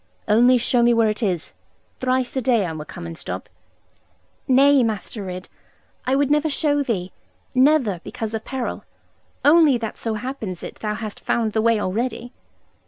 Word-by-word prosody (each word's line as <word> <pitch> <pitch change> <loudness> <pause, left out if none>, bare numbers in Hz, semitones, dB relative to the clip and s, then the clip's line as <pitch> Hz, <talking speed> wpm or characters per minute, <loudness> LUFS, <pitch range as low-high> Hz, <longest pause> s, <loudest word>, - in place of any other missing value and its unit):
'Only 245 +4 +5
show 245 0 +2
me 235 0 +4
where 225 -2 +3
it 215 - -5
is. 185 -7 -1 0.5
Thrice 255 0 0
a 265 - 0
day 235 -5 +2
I 170 - -3
will 155 -1 -6
come 175 +2 -9
and 165 -1 -6
stop - - -6 0.5
' - - -41
'Nay, 275 +1 +5
Master 215 -2 -3
Ridd, 185 -1 -6 0.6
I 260 - +3
would 280 0 +1
never 300 +1 +2
show 290 0 +1
thee 195 -9 -2 0.4
never, 255 - +3
because 225 -1 -5
of 220 0 -3
peril 260 -2 -4 0.6
only 300 -3 +6
that 225 -2 -6
so 225 -1 -2
happens 220 -6 -5
it - - -8
thou 210 -1 -3
hast 215 -1 -6
found 225 -3 -1
the 220 - +2
way 230 -1 +3
already.' 235 +5 -3
230 Hz, 175 wpm, -22 LUFS, 210-260 Hz, 0.6 s, only